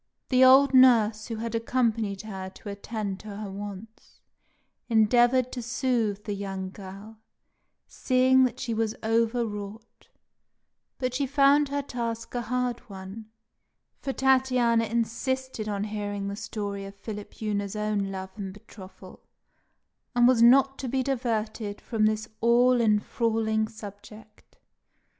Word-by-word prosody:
The 255 0 +5
old 270 +2 +7
nurse, 225 -5 +5
who 230 - -4
had 230 +1 -4
accompanied 230 -4 0
her 190 -3 -6
to 205 - -9
attend 200 -1 -5
to 210 -2 -9
her 205 -1 -6
wants, 205 +2 -9 0.7
endeavoured 240 +3 +4
to 245 - -5
soothe 235 -4 -1
the 210 - -3
young 195 -1 -5
girl, 200 +3 -11 0.7
seeing 260 0 +3
that 250 0 -3
she 245 -3 -3
was 220 -1 -1
over 230 +2 +1
wrought; 210 +1 -9 0.9
but 255 -1 -2
she 275 +2 -1
found 280 +1 +4
her 285 0 -2
task 230 -3 -5
a 245 - -1
hard 250 +1 -2
one, 195 +3 -9 0.7
for 270 - -3
Tatiana 255 -3 +2
insisted 235 +1 -2
on 200 -1 -2
hearing 205 -1 -4
the 200 - -4
story 200 -1 -5
of 195 0 -10
Philipjewna's 210 -1 -4
own 210 -1 -1
love 190 -1 -6
and 195 -2 -5
betrothal, 205 -2 -14 0.9
and 240 0 +5
was 250 -2 +4
not 270 +3 +5
to 265 - -4
be 260 +1 0
diverted 225 -5 -2
from 215 -3 +1
this 215 0 -1
all 245 +1 +4
enthralling 220 0 +1
subject. 215 0 -13
225 Hz, 135 wpm, -27 LUFS, 205-250 Hz, 0.9 s, old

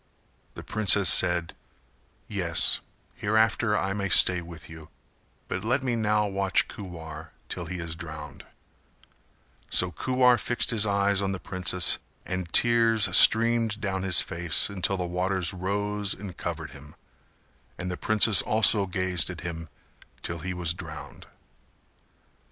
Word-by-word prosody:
The - - -10
princess 105 -3 +4
said 85 -2 +3 0.7
"Yes: 85 -5 +2 0.3
hereafter 110 -1 0
I 95 0 -3
may 100 -1 -4
stay 90 -1 +6
with 85 -2 -13
you, 80 -1 -14 0.6
but - - -6
let 130 +5 -1
me 125 -2 -2
now 105 -1 -1
watch 100 -1 0
Kuwar 80 -5 -10 0.2
till 85 -2 -6
he 90 +2 -7
is 85 -1 -6
drowned;" 80 -4 -10 1.3
so 90 0 +2
Kuwar 125 - +1
fixed 120 - 0
his 110 -2 0
eyes 100 0 0
on 95 -1 -3
the 95 - -7
princess 90 -1 +1 0.3
and 90 -2 -6
tears 115 -5 +3
streamed 115 -1 +5
down 95 -3 -4
his 95 -2 +3
face 85 +2 0
until 95 0 -1
the 90 - -4
waters 90 0 -3
rose 100 +2 -3
and 95 -2 -10
covered - - -7
him; 75 +1 -15 0.8
and 90 +1 -6
the - - -4
princess 110 +2 +4
also 110 -2 +2
gazed 95 -1 -1
at 90 -3 -9
him 85 -2 -8 0.5
till 85 -1 -6
he 90 +3 -6
was 85 -2 -1
drowned. 80 -5 -11
95 Hz, 140 wpm, -25 LUFS, 85-105 Hz, 1.3 s, stay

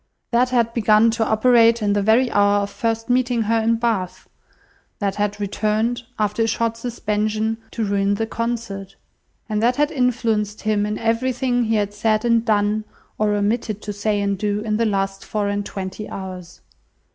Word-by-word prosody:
That 250 +1 +3
had 235 -2 +1
begun 220 0 +4
to 225 0 0
operate 230 +1 +4
in 205 -2 +1
the 205 - +1
very 230 +5 +3
hour 205 0 +3
of 200 - -5
first 225 0 -2
meeting 245 -2 +1
her 225 +2 +1
in 230 +1 +2
Bath; 225 -6 -2 0.7
that 200 -1 -2
had 205 0 -1
returned, 215 +4 -1 0.2
after 210 +1 0
a 225 - +2
short 230 0 0
suspension, 220 -1 -2
to 225 - -2
ruin 200 0 +1
the 225 - -1
concert; 230 -4 -4 0.5
and 215 -1 -1
that 240 +2 +3
had 295 +1 +1
influenced 230 -6 0
him 210 -1 +1
in 210 0 -2
everything 245 +1 0
he 225 0 +1
had 205 -1 0
said 215 +1 +1
and 230 -1 +3
done, 210 -1 +1 0.4
or 210 -1 +2
omitted 210 +1 -1
to 205 - -4
say 205 +1 -1
and 200 -1 -1
do, 205 0 -1
in 215 -1 -1
the 230 0 +1
last 195 -1 -1
four 210 -1 -2
and 205 0 -2
twenty 195 +2 -6
hours. 185 -2 -8
215 Hz, 180 wpm, -21 LUFS, 205-230 Hz, 0.7 s, begun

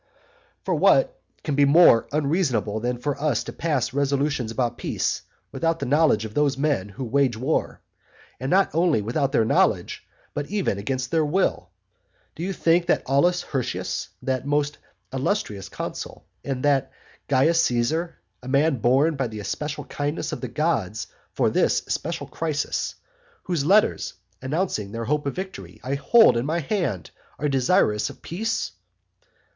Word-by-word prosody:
IV. - - -47
For - - 0
what - - +3 0.2
can 150 - -2
be 145 +1 +4
more 140 -5 +6
unreasonable 140 - 0
than 120 +2 -2
for 140 +3 -3
us 150 -7 +1
to - - -7
pass 145 -7 -1
resolutions 140 -3 0
about 120 0 -2
peace - - -1 0.3
without 165 0 0
the 140 - -4
knowledge 140 -5 +3
of 110 - -8
those 145 -1 +1
men 140 -9 0
who 130 +7 -7
wage 135 +1 +2
the 110 - -7
war? 145 +5 -1 0.6
And 130 +2 -3
not 195 +3 +3
only 165 -8 +2
without 135 +5 0
their 115 -6 +3
knowledge, - - +1 0.3
but 145 0 -3
even 195 - -1
against 130 +4 -3
their 160 -1 +3
will? 150 - 0 0.6
Do - - -9
you 185 +3 -2
think 170 -1 +2
that - - +2
Aulus 175 +7 +2
Hirtius, 130 -4 -3
that 130 -1 -1
most 145 +1 0 0.3
illustrious 130 - -2
consul, - - -6 0.2
and 135 -2 -3
that 140 -2 +2 0.4
Carus 150 +5 +4
Caesar, 155 +9 0 0.2
a 125 - -11
man 140 +2 +2
born 135 +8 +3
by 135 -2 -1
the 110 -2 -7
especial 150 +9 -4
kindness 145 +3 -3
of - - -5
the 130 - -3
gods 115 - -1 0.3
for - - +1
this - - +2
especial - - -3
crisis, 155 -3 -2 0.5
whose 165 -6 -1
letters, 205 +3 +3 0.3
announcing 130 - -2
their 115 0 -3
hope 150 +3 0
of 140 - -3
victory, 190 +1 -7
I 130 - -2
hold 140 - +5
in 120 - -1
my 165 +3 0
hand, 140 - -2 0.3
are 150 - -1
desirous 130 - +2
of - - -13
peace? 220 +7 -2
140 Hz, 160 wpm, -24 LUFS, 125-165 Hz, 0.6 s, more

